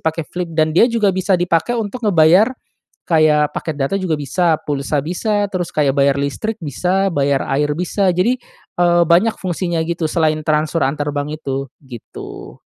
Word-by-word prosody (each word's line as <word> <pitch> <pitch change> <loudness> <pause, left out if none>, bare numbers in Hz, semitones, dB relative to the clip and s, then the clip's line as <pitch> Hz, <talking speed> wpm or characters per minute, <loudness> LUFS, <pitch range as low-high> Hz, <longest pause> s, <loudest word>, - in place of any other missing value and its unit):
pakai 160 0 -2
Flip 175 +1 -5
dan 155 0 +2
dia 225 +9 +5
juga 220 -5 +1
bisa 185 0 +1
dipakai 175 +7 0
untuk 225 +2 -4
ngebayar, 185 0 +4 0.6
kayak 155 -3 +3
paket 160 -3 -4
data 145 +8 -1
juga 175 -4 -1
bisa, 160 +3 +1
pulsa 140 0 -2
bisa, 205 +5 -1
terus 180 -2 -2
kayak 145 -3 +1
bayar 140 0 +2
listrik 140 +11 -3
bisa, 180 +6 0
bayar 140 -1 +1
air 145 +1 0
bisa. 185 +3 0
Jadi, 205 +9 +1 0.4
eee, 175 0 +4
banyak 180 +7 +3
fungsinya 175 -2 -2
gitu 170 -1 -2
selain 155 -2 +1
transfer 155 +1 0
antar 145 +1 -1
bank 145 +1 -3
itu 135 0 -3 0.2
gitu. 115 - -10
165 Hz, 165 wpm, -18 LUFS, 150-185 Hz, 0.6 s, dia